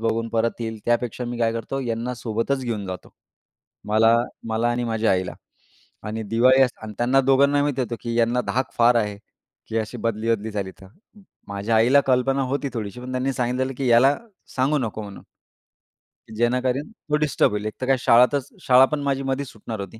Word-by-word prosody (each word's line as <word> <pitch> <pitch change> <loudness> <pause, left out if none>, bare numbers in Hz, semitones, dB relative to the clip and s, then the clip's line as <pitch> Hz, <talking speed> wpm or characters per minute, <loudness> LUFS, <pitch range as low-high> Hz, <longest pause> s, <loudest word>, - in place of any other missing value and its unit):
बघून 115 0 -1
परत 115 +1 -1
येईल. 110 -1 -4
त्यापेक्षा 120 +1 -1
मी 120 0 -5
काय 115 -1 +1
करतो 115 +4 -4
यांना 120 0 -3
सोबतच 115 +4 -2
घेऊन 110 -4 -3
जातो. 95 -1 -7 0.8
मला 115 +2 +4 0.3
मला 115 +2 0
आणि 120 0 -1
माझ्या 115 -1 0
आईला. 95 -1 -1 0.7
आणि 110 +1 -4
दिवाळी 125 +5 +4
अस 125 - +3
आणि 110 -1 -7
त्यांना 125 +3 +3
दोघांना 140 +2 +3
माहिती 145 -2 -1
होतं 120 -2 -2
की 115 -1 -4
यांना 120 +2 +2
धाक 130 +1 -1
फार 120 +1 +5
आहे 105 -3 -1 0.5
की 115 0 -1
अशी 110 - -4
बदली 115 0 -1
बदली 110 +1 -6
झाली 100 -2 -4
तर. 95 - -13 0.6
माझ्या 100 +3 -1
आईला 125 +6 +5
कल्पना 135 +1 +2
होती 140 +2 -2
थोडीशी 110 0 -5
पण 125 +1 -7
त्यांनी 130 +1 -1
सांगितलेलं 130 +2 -1
की 135 - -1
याला 125 +4 +5 0.4
सांगू 135 +4 +2
नको 110 -4 -3
म्हणून. 100 -2 -10 1.1
जेणेकरून 125 +4 0
तो 155 -9 -3
डिस्टर्ब 150 -7 +2
होईल. 105 0 -3
एक 110 - -3
तर - - -1
काय 135 - +3
शाळा 120 +1 +6
त 145 - +3 0.2
शाळा 130 +1 +6
पण 150 +2 -3
माझी 135 -1 -1
मधीच 135 +1 -2
सुटणार 110 0 -7
होती. 100 +3 -8
120 Hz, 190 wpm, -23 LUFS, 110-130 Hz, 1.1 s, शाळा